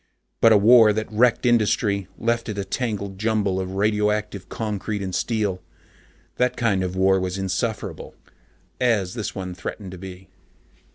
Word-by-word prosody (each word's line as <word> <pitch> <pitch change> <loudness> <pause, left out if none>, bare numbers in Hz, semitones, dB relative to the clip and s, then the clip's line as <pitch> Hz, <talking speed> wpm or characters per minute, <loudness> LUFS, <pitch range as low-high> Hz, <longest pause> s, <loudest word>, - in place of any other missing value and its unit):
But 115 - +7
a 110 - +7
war 110 +1 +7
that 110 +1 -3
wrecked 120 +3 +2
industry, 105 -4 +2
left 115 0 -1
it 105 - -4
a 100 - -2
tangled 100 -3 -3
jumble 105 -3 0
of 95 0 -4
radioactive 105 -1 0
concrete 105 -1 -3
and 95 -1 -4
steel 105 -5 -1 0.8
that 125 0 +1
kind 105 -6 +1
of 90 0 -3
war 95 0 +3
was 95 0 -3
insufferable, 95 -2 -3 0.6
as 110 -7 +1
this 110 -4 -4
one 95 -2 -5
threatened 95 +1 -7
to 95 - -9
be. 95 0 -10
105 Hz, 155 wpm, -23 LUFS, 95-110 Hz, 0.8 s, But